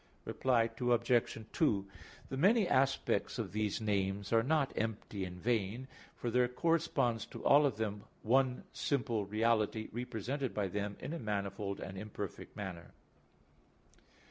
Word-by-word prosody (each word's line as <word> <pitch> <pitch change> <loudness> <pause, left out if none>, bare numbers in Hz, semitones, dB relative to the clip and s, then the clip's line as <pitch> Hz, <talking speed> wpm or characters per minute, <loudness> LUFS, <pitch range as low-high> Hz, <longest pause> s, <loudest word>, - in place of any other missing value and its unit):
Reply 120 -3 +2
Obj. 120 -1 +2 0.2
2: 105 - +2 0.4
The - - -3
many 195 - +4
aspects 135 -4 +1
of - - -3
these 105 -1 -1
names 100 -1 -1
are 115 - +6
not 140 +2 +1
empty 105 -3 -2
and 90 0 -8
vain, 115 +3 -1 0.3
for 120 - -3
there 125 +1 +4
corresponds 135 -5 +1
to - - -9
all 145 +1 +7
of 120 -6 -3
them 105 -2 -3 0.2
one 130 +2 +2
simple 120 -7 0
reality 110 0 +1
represented 125 +3 -3
by 100 -2 0
them 100 +1 -3
in - - -4
a 170 - -4
manifold 100 -2 -3
and 95 -1 -6
imperfect 105 -2 -6
manner. 90 -4 -6
115 Hz, 140 wpm, -34 LUFS, 100-130 Hz, 0.4 s, all